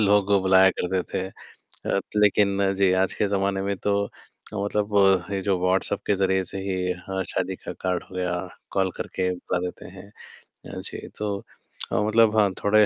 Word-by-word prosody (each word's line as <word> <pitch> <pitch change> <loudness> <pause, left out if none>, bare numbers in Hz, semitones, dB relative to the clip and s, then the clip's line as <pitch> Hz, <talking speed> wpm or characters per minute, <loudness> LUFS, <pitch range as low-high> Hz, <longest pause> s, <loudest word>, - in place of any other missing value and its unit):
लोगों 105 0 +5
को 100 -1 +4
बुलाया 95 0 +6
करते 90 +1 0
थे। 95 - -1
अ, 100 - -5 0.2
लेकिन, 100 -1 +3
जी, 95 -1 +3
आज 95 +1 +2
के 105 - 0
जमाने 100 -1 0
में 100 0 -1
तो 100 +1 +1
अ, - - -17
मतलब 105 0 -1 0.4
ये 100 - 0
जो 95 -1 +1
व्हॉट्सएप 95 +2 +1
के 105 - +3
ज़रिए 95 0 +2
से 95 - -6
ही 95 -2 -1 0.2
हाँ, 95 0 -1
शादी 95 0 -2
का - - -7
कार्ड 90 -1 -1
हो - - -15
गया, 90 -1 -1 0.4
कॉल 95 -1 +1
करके 90 0 -2
बुला 90 0 -2
देते - - -10
हैं। 95 +1 -11 0.4
अ, - - -11
जी, - - -6
तो 105 -2 -1 0.5
अ, - - 0
मतलब 110 0 +4
हाँ, 105 -2 +4
थोड़े 105 +1 +5
95 Hz, 185 wpm, -25 LUFS, 95-100 Hz, 0.5 s, बुलाया